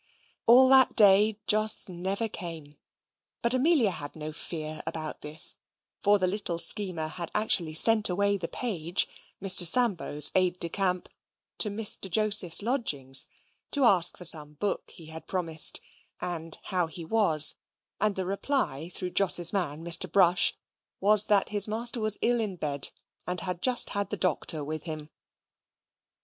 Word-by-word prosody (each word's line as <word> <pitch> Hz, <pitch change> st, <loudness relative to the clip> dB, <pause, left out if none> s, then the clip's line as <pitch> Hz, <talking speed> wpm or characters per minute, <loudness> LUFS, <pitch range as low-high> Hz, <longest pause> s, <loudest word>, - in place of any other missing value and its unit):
All 250 Hz, +3 st, +5 dB
that 265 Hz, -1 st, +4 dB
day 205 Hz, +1 st, +4 dB
Jos 215 Hz, +1 st, +1 dB
never 190 Hz, +5 st, -4 dB
came. 165 Hz, -7 st, -10 dB, 0.7 s
But 235 Hz, +1 st, -1 dB
Amelia 260 Hz, -, +1 dB
had 145 Hz, -4 st, -9 dB
no 155 Hz, 0 st, -7 dB
fear 155 Hz, -1 st, -6 dB
about 160 Hz, -1 st, -6 dB
this; 150 Hz, +1 st, +3 dB, 0.4 s
for 205 Hz, 0 st, +2 dB
the 185 Hz, -, -2 dB
little 185 Hz, -2 st, -4 dB
schemer 180 Hz, -3 st, +3 dB
had 170 Hz, +1 st, -7 dB
actually 175 Hz, -7 st, 0 dB
sent 215 Hz, +4 st, +3 dB
away 200 Hz, +3 st, -1 dB
the 180 Hz, -4 st, -6 dB
page, 180 Hz, -8 st, -2 dB, 0.3 s
Mr. 190 Hz, -2 st, +3 dB
Sambo's 175 Hz, -6 st, +2 dB
aide 180 Hz, -1 st, 0 dB
de 170 Hz, -, -4 dB
camp, 185 Hz, -1 st, -2 dB, 0.5 s
to 210 Hz, -, +3 dB
Mr. 205 Hz, -2 st, +1 dB
Joseph's 205 Hz, -2 st, +2 dB
lodgings, 145 Hz, -, +1 dB, 0.4 s
to 285 Hz, -, +1 dB
ask 185 Hz, -7 st, +3 dB
for 180 Hz, -, -9 dB
some 150 Hz, -3 st, +4 dB
book 200 Hz, +7 st, -5 dB
he 165 Hz, -, -12 dB
had 160 Hz, +1 st, -10 dB
promised, 165 Hz, -4 st, +1 dB, 0.4 s
and 165 Hz, -2 st, -7 dB
how 180 Hz, -3 st, -3 dB
he 165 Hz, 0 st, -9 dB
was; 165 Hz, -6 st, +4 dB, 0.5 s
and 210 Hz, -1 st, -1 dB
the 190 Hz, -, -5 dB
reply 185 Hz, -, -4 dB
through 180 Hz, 0 st, -4 dB
Jos's 175 Hz, -2 st, +3 dB
man, 165 Hz, -5 st, -4 dB
Mr. 170 Hz, -1 st, 0 dB
Brush, 180 Hz, -2 st, +3 dB, 0.4 s
was, 210 Hz, +1 st, +5 dB
that 205 Hz, -2 st, +1 dB
his 205 Hz, -1 st, +5 dB
master 235 Hz, +3 st, +1 dB
was 215 Hz, -1 st, +3 dB
ill 240 Hz, 0 st, 0 dB
in 210 Hz, -4 st, -4 dB
bed, 145 Hz, -5 st, -2 dB, 0.4 s
and 180 Hz, 0 st, -4 dB
had 180 Hz, -1 st, -5 dB
just 250 Hz, -2 st, +3 dB
had 200 Hz, 0 st, -4 dB
the -, -, -5 dB
doctor 160 Hz, -3 st, -2 dB
with 155 Hz, +2 st, -6 dB
him. 155 Hz, -2 st, -7 dB
185 Hz, 155 wpm, -26 LUFS, 160-210 Hz, 0.7 s, All